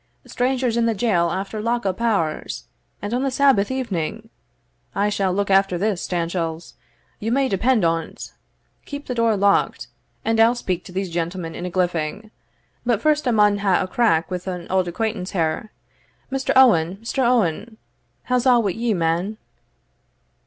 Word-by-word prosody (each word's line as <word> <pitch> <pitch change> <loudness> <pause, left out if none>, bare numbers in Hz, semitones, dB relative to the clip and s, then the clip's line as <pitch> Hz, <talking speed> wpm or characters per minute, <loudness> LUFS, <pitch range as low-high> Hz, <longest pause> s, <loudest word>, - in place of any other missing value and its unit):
strangers 250 -2 0
in 230 0 +2
the 225 - +1
jail 190 -6 +2
after 195 +4 -3
lock 235 +1 -1
up 190 +3 -2
hours, 200 -10 -1 0.4
and 205 +2 -3
on 250 - 0
the 275 - +1
Sabbath 260 -6 +3
evening! 225 -4 -3 0.6
I 205 +1 +2
shall 195 -2 0
look 200 +1 -1
after 195 -2 +3
this, 200 -1 -1
Stanchells, 170 -2 -3 0.5
you 225 +2 -2
may 270 +2 +2
depend 225 0 +2
on't 165 -1 -2 0.5
Keep 285 0 -7
the 250 - -3
door 230 -3 +2
locked, 195 -11 +1 0.4
and 225 0 +1
I'll 230 +2 +5
speak 185 -7 -3
to 180 - -10
these 190 -1 -3
gentlemen 170 0 -3
in 180 - -5
a - - -3
gliffing 180 +3 -2 0.5
But 235 -4 +1
first 300 +2 +1
I - - +3
maun 210 -2 +4
hae 195 -2 +2
a - - 0
crack 185 -5 +1
wi' 180 - -1
an 180 -2 -5
auld 185 -1 +1
acquaintance 200 0 -3
here. 165 +4 -1 0.6
Mr. 270 0 -1
Owen, 195 -9 +5
Mr. 240 - -3
Owen, 225 -2 +1 0.5
how's 250 0 +1
a' 245 -2 +6
wi' 205 -4 +1
ye, 225 +2 -1
man?" 170 +5 -1
200 Hz, 165 wpm, -22 LUFS, 180-235 Hz, 0.6 s, a